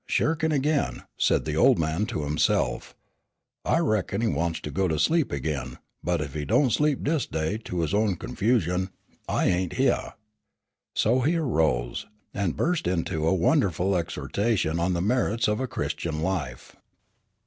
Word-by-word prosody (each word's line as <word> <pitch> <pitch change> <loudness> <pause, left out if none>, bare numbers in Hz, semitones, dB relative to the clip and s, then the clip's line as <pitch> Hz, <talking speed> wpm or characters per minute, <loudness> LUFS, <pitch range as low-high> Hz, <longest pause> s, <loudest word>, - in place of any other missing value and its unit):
"Shirkin' 160 0 +1
again," 140 - 0
said - - +2
the - - -2
old - - +5
man 80 +6 0
to 75 - -3
himself, 75 +1 0 0.7
"I - - +2
reckon 110 - 0
he 115 - +2
wants 85 -5 -1
to 75 - -5
go 95 +4 +1
to 80 -2 0
sleep 160 - +2
again, 70 0 -3 0.3
but 85 -2 0
ef 70 -3 -5
he 75 0 -3
don't 125 - +3
sleep 150 +1 +1
dis 150 -1 0
day 80 +7 -2
to 90 -2 -2
his 80 +3 -1
own 105 -2 +2
confusion, 95 -2 0 0.4
I - - +1
ain't 90 -1 +1
hyeah." - - 0 0.8
So 120 +4 +3
he 150 +7 +2
arose, 80 - 0 0.3
and 100 -4 -1
burst 170 - 0
into 85 -2 -1
a 95 - +3
wonderful 95 - +2
exhortation 85 - -1
on 90 +2 +1
the 85 - -1
merits 115 0 +1
of 105 0 0
a 130 - -1
Christian 80 -9 -3
life. 80 -10 -3
95 Hz, 160 wpm, -26 LUFS, 80-120 Hz, 0.8 s, old